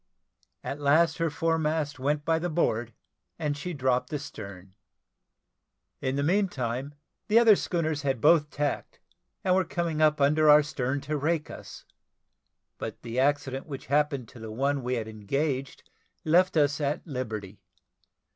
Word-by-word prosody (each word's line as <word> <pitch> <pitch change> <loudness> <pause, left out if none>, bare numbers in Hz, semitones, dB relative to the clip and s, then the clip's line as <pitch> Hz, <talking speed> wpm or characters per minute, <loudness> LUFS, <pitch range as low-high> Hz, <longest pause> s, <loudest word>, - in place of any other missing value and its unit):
At 140 - -4
last 155 +4 +3
her 165 0 +1
foremast 155 -2 -1
went 145 +2 -1
by 165 0 +2
the 175 +2 -2
board, 120 -8 0 0.5
and 150 -3 -1
she 160 +5 -5
dropped 130 -4 0
astern. 100 -10 -7 1.3
In 130 +1 -1
the 140 - 0
meantime 145 - -1 0.3
the 220 +1 +4
other 230 -3 +7
schooners 160 -6 -1
had 135 -3 -1
both 150 +3 +4
tacked, 145 0 -3 0.4
and 185 - +3
were 190 0 +3
coming 165 -2 -2
up 155 -1 +4
under 150 +2 +4
our 150 0 +8
stern 140 -2 -2
to 150 +2 -2
rake 155 +1 -1
us, - - -10 0.9
but - - -6
the 120 +2 -3
accident 135 0 0
which 135 -3 -7
happened 145 -4 +1
to 120 - -13
the 110 -1 -7
one 140 +4 0
we 125 +1 -1
had 115 -2 -3
engaged 130 +6 -3 0.4
left 175 +3 +3
us 145 0 +2
at 145 +1 -1
liberty. 110 - -5
145 Hz, 150 wpm, -27 LUFS, 130-160 Hz, 1.3 s, our